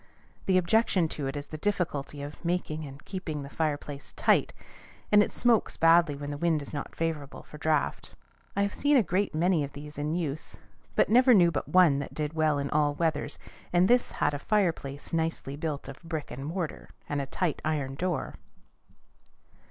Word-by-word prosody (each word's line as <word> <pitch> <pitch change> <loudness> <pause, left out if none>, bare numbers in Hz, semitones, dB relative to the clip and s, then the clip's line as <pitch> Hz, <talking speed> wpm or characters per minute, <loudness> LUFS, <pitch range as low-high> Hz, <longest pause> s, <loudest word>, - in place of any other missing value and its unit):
The 190 -1 +4
objection 185 -1 +3
to 145 -3 -4
it 135 - -4
is 145 0 -4
the 155 +1 -8
difficulty 155 -7 -2
of 145 +1 -9
making 165 -3 -2
and 140 +2 -12
keeping 160 -7 -4
the 140 - -9
fireplace 145 -2 -3
tight, - - +3 0.6
and 210 0 +7
it - - +1
smokes 240 -2 +2
badly 165 -2 +5
when 145 +1 -5
the 145 - -5
wind 160 -3 +1
is 140 - -10
not 145 - -5
favorable 155 -4 -3
for 150 - -12
draught. 155 -1 -1 0.4
I 200 - +2
have 200 - -1
seen 290 0 +3
a 240 - +5
great 185 0 0
many 170 -1 +2
of 140 0 -6
these 145 0 -9
in 150 +2 -1
use, 155 -4 -4 0.4
but - - +4
never 250 +2 +6
knew 175 -3 +6
but 160 - -3
one 175 -7 +5
that 140 - -6
did 150 0 -2
well 155 -2 +2
in 140 0 -2
all 145 -1 +2
weathers, 160 -2 -1 0.3
and 175 +1 +4
this 245 +2 +3
had - - +1
a 145 - -3
fireplace 165 -9 -1
nicely 160 -4 -1
built 145 -2 -4
of 135 -1 -9
brick 160 -3 -5
and 135 +4 -6
mortar, 170 -1 -4 0.2
and 145 -1 -1
a 135 - -5
tight 175 +1 -1
iron 145 -4 -1
door. 175 +4 -2
155 Hz, 190 wpm, -28 LUFS, 145-180 Hz, 0.6 s, and